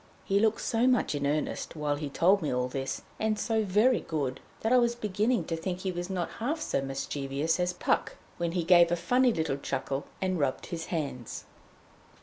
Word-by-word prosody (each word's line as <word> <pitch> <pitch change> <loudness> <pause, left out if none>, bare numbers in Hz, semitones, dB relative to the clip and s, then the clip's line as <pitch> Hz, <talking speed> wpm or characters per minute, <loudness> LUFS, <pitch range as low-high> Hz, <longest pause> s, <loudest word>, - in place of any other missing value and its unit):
He 195 +1 +2
looked 220 +1 +2
so 235 +2 +2
much 250 -9 +2
in 145 -1 -1
earnest 150 +3 -2
while 150 -2 0
he 145 0 -4
told 185 +7 +3
me 155 - -1
all 125 0 0
this, 135 +1 -4 0.2
and 215 -1 +1
so 220 0 +1
very 215 +6 +3
good, 140 -5 -3 0.2
that 225 +3 +2
I 255 - +7
was 235 -1 +2
beginning 215 +2 0
to 165 - -2
think 180 +2 -4
he 190 - -1
was 175 +1 -4
not 180 -3 -2
half 285 +8 -1
so 140 - -1
mischievous 135 +3 -2
as 180 0 +1
Puck, 180 - 0 0.2
when 170 -1 -1
he 180 -2 0
gave 170 0 +6
a - - +4
funny 250 +8 +3
little 160 -8 -1
chuckle, 135 0 -3
and 185 -2 0
rubbed 135 -3 0
his 165 -1 -5
hands. 140 -8 -4
175 Hz, 200 wpm, -29 LUFS, 145-215 Hz, 0.2 s, I